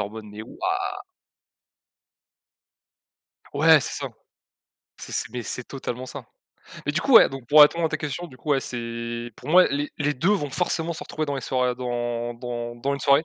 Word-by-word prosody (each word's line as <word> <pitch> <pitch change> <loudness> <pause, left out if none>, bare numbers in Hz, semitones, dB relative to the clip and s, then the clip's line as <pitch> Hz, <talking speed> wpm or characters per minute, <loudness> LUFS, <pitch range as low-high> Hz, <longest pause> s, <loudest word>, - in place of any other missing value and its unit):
en 100 - -2
mode: 110 +1 -9
«Mais 105 +1 -9
waouh.» 115 - -13 3.0
Ouais 155 +1 +6
c'est - - -3
ça, - - -3 0.9
c'est - - -9
c'est - - -1
mais 125 -2 -4
c'est 125 - -4
totalement 130 -1 -6
ça, 130 - -8 0.6
mais 145 - +1
du 155 - 0
coup, 275 - +2
ouais, - - +10
donc 135 -2 -9
pour 150 +1 +7
répondre 165 +3 +4
à - - -1
ta - - -2
question, 155 +4 -4
du 130 - -15
coup, 150 - -6
ouais, 135 -2 +3
c'est 115 -1 -5
pour 130 - -11
moi 180 +3 +7
les 145 +1 -2
les 150 0 0
2 160 +9 +1
vont 175 -9 0
forcément 170 +1 -1
se - - -7
retrouver 155 0 -4
dans 140 - -2
les 135 - -3
soirées, 125 -1 0
dans 120 -1 -3
dans 120 0 -5
dans 140 +4 -1
une 140 - -6
soirée. 140 +4 +4
130 Hz, 200 wpm, -24 LUFS, 120-150 Hz, 3.0 s, ouais